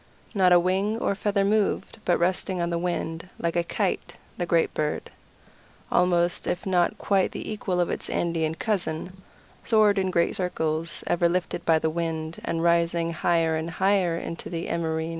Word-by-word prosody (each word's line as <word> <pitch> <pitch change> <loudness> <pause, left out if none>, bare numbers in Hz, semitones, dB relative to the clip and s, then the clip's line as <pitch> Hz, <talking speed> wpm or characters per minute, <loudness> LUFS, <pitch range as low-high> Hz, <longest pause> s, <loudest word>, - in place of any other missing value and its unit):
Not 190 -4 +4
a 175 - +8
wing 190 +5 +1
or 215 - 0
feather 200 0 0
moved, 210 +1 0
but 175 - +3
resting 185 +1 0
on 170 0 -1
the 170 - 0
wind, 170 -1 -3
like 170 0 -2
a 170 - +2
kite, - - -2 0.2
the 175 - -3
great 170 -1 +2
bird, 150 -1 -2 0.8
almost 175 -1 +2
if 180 - -2
not 180 -3 +2
quite 195 -2 +1
the - - -5
equal 190 -4 -2
of 175 - +1
its - - -4
Andean 165 -2 0
cousin, 185 -2 -3 0.4
soared 215 -3 +4
in 190 -1 0
great 170 -2 +1
circles, 160 -3 -2
ever 170 0 +2
lifted 175 -1 -2
by 165 -1 +5
the 160 0 0
wind, 160 -1 -3
and 165 0 -2
rising 170 0 +2
higher 165 -1 +1
and 160 +1 -3
higher 185 -1 +2
into 165 0 -6
the 170 -1 -4
empyrean. 160 -1 -1
175 Hz, 175 wpm, -26 LUFS, 165-185 Hz, 0.8 s, a